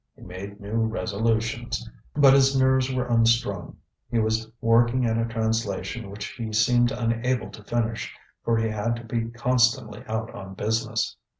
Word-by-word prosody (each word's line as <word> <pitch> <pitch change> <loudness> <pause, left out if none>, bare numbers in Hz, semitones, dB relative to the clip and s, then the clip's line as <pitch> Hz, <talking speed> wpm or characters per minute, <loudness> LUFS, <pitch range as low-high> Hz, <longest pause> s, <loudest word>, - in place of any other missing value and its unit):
He - - -16
made 100 +3 -8
new 110 +2 -1
resolutions. 115 +2 -1 0.3
But 140 -2 +7
his 135 0 +5
nerves 130 0 +3
were 130 -1 -1
unstrung. 115 -5 +1 0.3
He 120 - -1
was 110 0 0
working 120 +2 +3
at 115 0 +1
a 115 - +1
translation 110 -2 -2
which 100 +1 -6
he 115 -2 -6
seemed 120 +3 +4
unable 120 +2 -1
to 105 - -12
finish, 115 0 -2 0.3
for 115 -1 +2
he 115 0 +1
had 110 +2 -1
to 115 - -8
be 115 0 -2
constantly 120 -2 +1
out 110 +1 -3
on 95 -1 -8
business. 110 +2 -1
115 Hz, 160 wpm, -25 LUFS, 110-120 Hz, 0.3 s, But